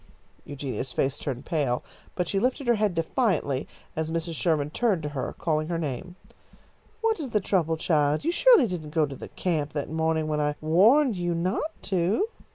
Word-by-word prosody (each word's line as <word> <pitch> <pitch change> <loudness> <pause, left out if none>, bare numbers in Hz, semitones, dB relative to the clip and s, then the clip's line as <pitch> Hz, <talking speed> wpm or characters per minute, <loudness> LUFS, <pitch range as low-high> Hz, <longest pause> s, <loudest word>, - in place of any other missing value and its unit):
Eugenia's 135 -2 -4
face 135 +1 0
turned 130 -3 -4
pale, 140 -7 0 0.3
but 180 -2 -1
she 195 - 0
lifted 260 +5 0
her 240 - +4
head 210 -4 +1
defiantly 165 - 0 0.3
as 160 0 -2
Mrs. 165 +1 -2
Sherman 155 -3 0
turned 200 -5 +1
to 150 - -2
her, 140 -3 -4
calling 155 -2 0
her 170 0 -1
name. 160 +3 -4 0.9
"What 445 -3 +1
is 285 -5 -4
the 215 - +2
trouble, 170 -5 +1
child? 150 - +1
You 335 - +2
surely 475 - +6
didn't 165 -6 -5
go 160 -2 +4
to 140 -1 -7
the - - -9
camp 155 -5 -2
that 145 0 -3
morning 160 0 +1
when 150 -1 0
I 150 0 0
warned 215 - +4
you 175 -1 -1
not 185 - -1
to?" 195 - +1
165 Hz, 185 wpm, -26 LUFS, 150-200 Hz, 0.9 s, surely